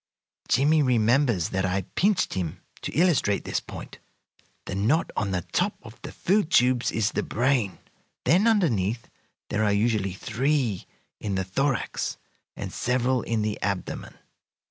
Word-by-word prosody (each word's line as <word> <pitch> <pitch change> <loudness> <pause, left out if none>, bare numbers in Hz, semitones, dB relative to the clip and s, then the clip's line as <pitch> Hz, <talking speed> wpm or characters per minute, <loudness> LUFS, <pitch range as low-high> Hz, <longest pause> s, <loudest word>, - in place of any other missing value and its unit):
Jimmie 150 +5 +4
remembers 120 - +2
that 95 0 -1
I 95 +1 0
pinched 200 +1 +2
him 90 -5 -4 0.2
to - - -4
illustrate 155 - +2
this - - -1
point. - - -10 0.7
The - - -5
knot 115 - +1
on 105 - -1
the 90 -2 -1
top - - +1
of - - -13
the - - -7
food 195 -2 +1
tubes 125 -5 +3
is 110 -1 0
the - - -1
brain, 120 -5 0 0.5
then 190 +7 +4
underneath 120 - +1 0.4
there 105 +1 +1
are 105 - +3
usually 100 -2 +1
three 120 0 -1 0.3
in 100 -2 -2
the 95 - 0
thorax 135 +8 -1 0.4
and - - -6
several 125 0 +1
in 115 -2 -1
the 105 -1 -2
abdomen. 100 -2 -3
115 Hz, 145 wpm, -26 LUFS, 100-140 Hz, 0.7 s, Jimmie